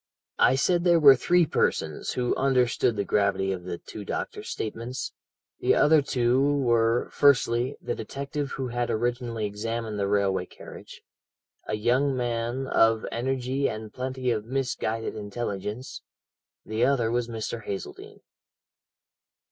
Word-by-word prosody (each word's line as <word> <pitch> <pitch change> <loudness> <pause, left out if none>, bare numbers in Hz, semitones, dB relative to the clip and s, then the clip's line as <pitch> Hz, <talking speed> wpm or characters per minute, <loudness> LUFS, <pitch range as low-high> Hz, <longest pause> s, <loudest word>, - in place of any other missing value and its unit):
"I - - +5
said 175 +5 +2
there 175 -2 +5
were 140 -3 +9
three 175 +6 +3
persons - - -1
who 125 -1 0
understood 125 -3 +2
the 100 - -1
gravity 95 -1 +1
of 90 -2 -5
the 90 -2 -4
two 105 - -9
doctors' - - -5
statements 115 +3 -4 0.5
the - - +3
other 155 0 +5
two 125 -1 +1
were, 120 -5 +2
firstly, 130 -2 +3
the - - -3
detective 140 0 -5
who 130 -2 -3
had 120 0 -2
originally 120 -1 -1
examined 110 +1 -4
the 100 - 0
railway 100 -2 +1
carriage, - - -12 0.6
a - - -1
young 125 +5 +1
man 120 +1 -2
of 115 -3 +3
energy 130 +2 -1
and 110 -1 -7
plenty 130 0 -2
of 110 -2 -1
misguided 115 -3 -2
intelligence, 105 +2 -5 0.6
the 110 +2 -1
other 125 -4 +2
was 120 0 0
Mr. 115 0 -5
Hazeldene. 100 -1 -7
120 Hz, 135 wpm, -26 LUFS, 110-130 Hz, 0.6 s, were